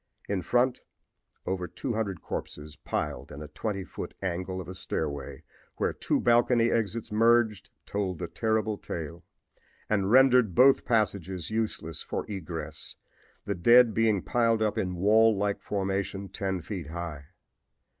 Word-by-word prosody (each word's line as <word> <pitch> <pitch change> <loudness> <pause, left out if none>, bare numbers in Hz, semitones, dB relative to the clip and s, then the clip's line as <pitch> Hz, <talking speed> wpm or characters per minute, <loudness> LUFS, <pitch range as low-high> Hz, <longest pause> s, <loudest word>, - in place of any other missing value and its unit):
In 100 -2 -1
front 120 +7 +1 0.6
over 90 -1 -2
200 110 - -3
corpses 75 +1 -6
piled 75 -3 -4
in 75 - -7
a - - -8
twenty 95 +6 -4
foot - - -8
angle 95 0 -3
of 90 - -7
a 95 - -6
stairway 75 -6 -4 0.3
where - - 0
two - - 0
balcony 120 0 +4
exits 115 0 -1
merged 110 -2 +3 0.2
told 95 -3 -2
the 90 - -4
terrible 110 +4 -1
tale, 85 +1 -6 0.7
and 100 -2 +2
rendered 125 -5 +5
both 135 +1 +6
passages 95 -6 0
useless 110 -8 -2
for - - -4
egress, 80 -6 -6 0.5
the 100 - -1
dead 120 +5 +6
being 110 -4 +2
piled 115 -2 +2
up 105 - 0
in 90 -1 -2
wall 110 +4 +4
like 100 0 -1
formation 100 0 -2
ten 95 -2 -2
feet 90 -5 -5
high. 80 -3 -6
100 Hz, 140 wpm, -28 LUFS, 90-110 Hz, 0.7 s, both